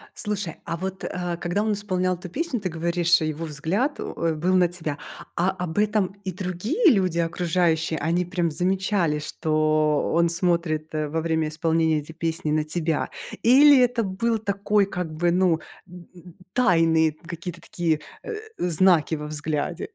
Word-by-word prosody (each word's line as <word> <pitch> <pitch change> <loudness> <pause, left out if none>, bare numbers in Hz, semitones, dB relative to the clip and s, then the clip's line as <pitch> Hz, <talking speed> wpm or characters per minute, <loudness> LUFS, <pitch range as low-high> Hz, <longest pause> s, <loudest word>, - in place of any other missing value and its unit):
Слушай, 205 -6 -2
а 165 - -3
вот, 190 +1 -5
э, 175 -1 -3
когда 185 +5 -1
он 220 - 0
исполнял 185 -3 -1
эту 180 0 -9
песню, 285 - -2
ты 185 -2 -3
говоришь, 170 +1 +2
его 155 +1 -2
взгляд, 170 - -1
э, - - -3 0.3
был 180 +4 +1
на 180 -1 +5
тебя. 160 -4 -4 0.4
А 180 +2 +2
об 180 -1 -5
этом 210 -2 +1
и 185 - -2
другие 210 - +1
люди, 185 -5 +1
окружающие, 165 -1 0
они 170 +4 0
прям 175 -2 -1
замечали, 185 -2 0
что 155 -1 +1
он 170 0 +3
смотрит 170 -3 0
во 155 +1 -1
время 160 -1 0
исполнения 160 -1 +1
этой 155 +2 -12
песни 160 -2 -2
на 155 0 +2
тебя? 160 -1 -1 0.3
Или 275 +3 +7
это 245 -2 +2
был 225 +4 0
такой 205 0 +1
как 180 -5 -5
бы, 170 +2 +1
ну, 175 -3 +3 0.3
д 180 -1 -13 0.5
тайные 165 -8 +3
какие-то 170 +1 -7
такие, 160 -3 -1 0.2
э, 460 - -5 0.2
знаки 170 -2 +3
во 150 0 -6
взгляде? 155 - -3
175 Hz, 155 wpm, -24 LUFS, 160-190 Hz, 0.5 s, Или